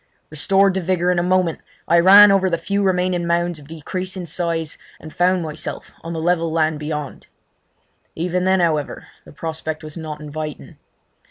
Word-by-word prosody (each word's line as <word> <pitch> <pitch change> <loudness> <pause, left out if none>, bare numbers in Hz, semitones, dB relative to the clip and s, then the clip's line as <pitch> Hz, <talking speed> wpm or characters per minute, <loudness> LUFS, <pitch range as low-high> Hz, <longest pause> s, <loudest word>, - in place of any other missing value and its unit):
Restored 195 +5 +3
to 190 - -1
vigour 180 0 +1
in 180 - +1
a - - +2
moment, 180 -2 +1 0.3
I 170 - +5
ran 200 +3 +9
over 190 -1 +3
the 170 - 0
few 200 +4 -1
remaining 180 -2 +1
mounds 170 -1 0
of 140 - -15
decreasing 180 +4 -5
size, 165 -1 -3 0.2
and 155 - -11
found 180 0 +2
myself 155 -2 -6
on 165 - -7
the 165 - -3
level 165 0 +1
land 155 -1 +1
beyond. 150 -2 -5 0.9
Even 180 +2 -1
then, 190 0 +3
however, 155 -4 -1 0.2
the - - -13
prospect 160 0 -5
was 155 -1 -8
not 155 -2 -6
inviting. 150 0 -7
170 Hz, 170 wpm, -20 LUFS, 155-185 Hz, 0.9 s, ran